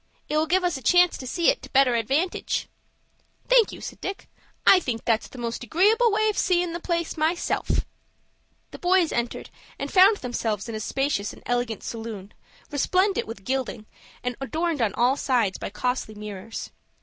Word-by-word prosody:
It 300 - -1
will 310 +1 +2
give 365 +3 +2
us 350 -5 0
a - - -9
chance 355 +7 +4
to 255 - -7
see 340 - +2
it - - +1
to - - -11
better 265 -2 +4
advantage." 275 - 0 0.8
"Thank - - +5
you," - - -9
said - - -8
Dick; 390 +1 -5 0.4
"I 380 - +8
think 240 -9 -4
that's 225 -1 +1
the - - -13
most 235 0 -4
agreeable 420 - +3
way 435 +1 +2
of 425 - 0
seein' 355 -2 +1
the 340 - -3
place 340 -1 -2
myself." 320 +3 0 1.0
The - - -10
boys 360 -2 +3
entered, 235 0 -3 0.3
and - - -5
found 395 +2 +7
themselves 230 - -3
in 230 - -5
a 215 - -3
spacious 270 -3 -1
and - - -15
elegant 245 -3 -1
saloon, 220 -4 -7 0.4
resplendent 370 +7 +1
with 200 -4 -9
gilding, 255 -4 -2 0.4
and 250 0 -2
adorned 315 +1 -1
on 220 -3 +1
all 250 +3 +3
sides 235 -9 +1
by - - -4
costly 215 +1 -2
mirrors. 210 +1 -7
270 Hz, 180 wpm, -25 LUFS, 230-355 Hz, 1.0 s, I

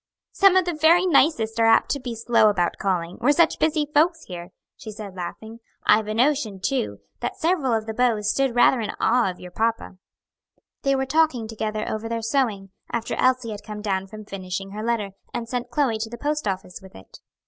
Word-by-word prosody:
"Some 390 -1 +5
of 375 -1 +4
the 350 - -1
very 325 +4 +4
nicest 260 -9 +2
are 225 - +4
apt 225 - +4
to 280 - -1
be 245 -3 -5
slow 230 -1 +3
about 175 -4 0
calling 180 -3 -2
we're 265 - +4
such 325 +2 +3
busy 310 -1 +1
folks 325 +2 +3
here," 175 -1 -8 0.3
she - - -10
said, 210 -2 -8
laughing. 220 +5 -7 0.3
"I've 215 0 +4
a 215 - -3
notion, 245 -5 +1
too, 255 +3 -2 0.2
that - - -4
several 320 -6 +1
of 220 -1 0
the 220 - -4
beaux 235 -2 +1
stood 245 +4 0
rather 245 +1 +5
in 215 - -3
awe 240 -3 +3
of 180 - -8
your 180 - -10
papa." 225 -1 -2 0.8
They 275 0 +2
were 265 0 0
talking 285 -6 +1
together 215 -1 -3
over 220 +1 -4
their 230 -1 -3
sewing, 220 -6 -1 0.2
after 230 -1 -2
Elsie 255 -3 +1
had 210 -1 -7
come 210 0 -8
down 195 -2 -1
from 215 +1 -10
finishing 195 -1 -6
her 210 +1 -6
letter, 225 -4 -1 0.2
and 230 - -3
sent 245 0 -4
Chloe 240 -4 0
to 225 +1 -3
the 235 - -8
post 295 0 -2
office 185 -2 -4
with 190 0 -15
it. 95 - -14
225 Hz, 210 wpm, -23 LUFS, 210-270 Hz, 0.8 s, Some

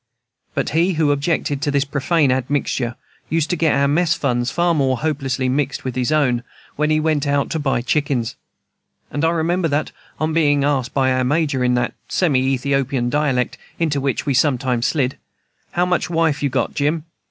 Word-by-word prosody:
But - - -1
he 170 +4 +2
who 155 -3 +2
objected 145 -1 0
to 150 - 0
this 140 0 +1
profane 145 +1 +1
admixture 130 -2 -1 0.3
used 165 +1 0
to - - +2
get 160 -2 +2
our 140 0 +3
mess 160 +3 +2
funds 120 -3 0
far 175 +4 +1
more 135 -4 +1
hopelessly 135 -3 -1
mixed 135 +1 -1
with 130 - -3
his 130 +2 0
own, 135 -6 +2 0.3
when 150 +1 +1
he 155 0 +3
went 155 -2 0
out 140 0 0
to 160 - -1
buy 135 -5 0
chickens. 130 -3 0 0.8
And 145 - -2
I 165 - +4
remember 170 +1 +1
that, 145 0 -1 0.3
on 155 0 0
being 145 -3 +3
asked 135 -3 0
by 130 -2 +3
our 130 0 +1
Major, 140 -1 +1
in 125 0 +2
that 125 - 0 0.2
semi 155 -8 +2
Ethiopian 135 -1 0
dialect 140 -4 0 0.2
into 150 -4 0
which 135 -2 -1
we 140 - +1
sometimes 130 -3 +1
slid, 135 -4 -1 0.5
"How 175 +1 +2
much 180 0 0
wife 165 -3 +1
you 140 - +1
got, 125 -2 -1
Jim?" 150 +2 0
145 Hz, 185 wpm, -20 LUFS, 130-155 Hz, 0.8 s, I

